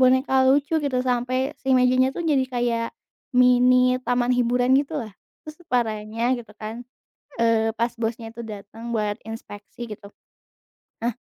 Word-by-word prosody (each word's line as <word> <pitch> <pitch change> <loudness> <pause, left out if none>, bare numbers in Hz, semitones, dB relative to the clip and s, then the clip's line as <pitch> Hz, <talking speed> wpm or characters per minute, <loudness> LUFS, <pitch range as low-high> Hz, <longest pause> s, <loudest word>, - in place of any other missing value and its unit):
boneka 260 +1 +4
lucu, 290 +3 +2
gitu. 265 -3 0
Sampai 255 +3 -1
si 265 - -1
mejanya 255 +1 +4
tuh 345 - -3
jadi 280 -4 +3
kayak 240 -2 0 0.5
mini 250 0 +5
taman 245 0 +1
hiburan 245 +1 +2
gitu 290 +2 -1
lah, 220 -5 -6 0.3
terus 310 0 -9
parahnya 230 0 0
gitu 235 -3 -10
kan, 220 +2 -6 0.6
eee, 225 -1 +2
pas 235 +1 0
bosnya 225 0 -3
itu 235 - -10
datang 220 +2 -8
buat 210 0 -1
inspeksi 225 +1 -9
gitu. 205 -1 -9 0.9
Nah, 235 -1 0
245 Hz, 145 wpm, -24 LUFS, 225-255 Hz, 0.9 s, mini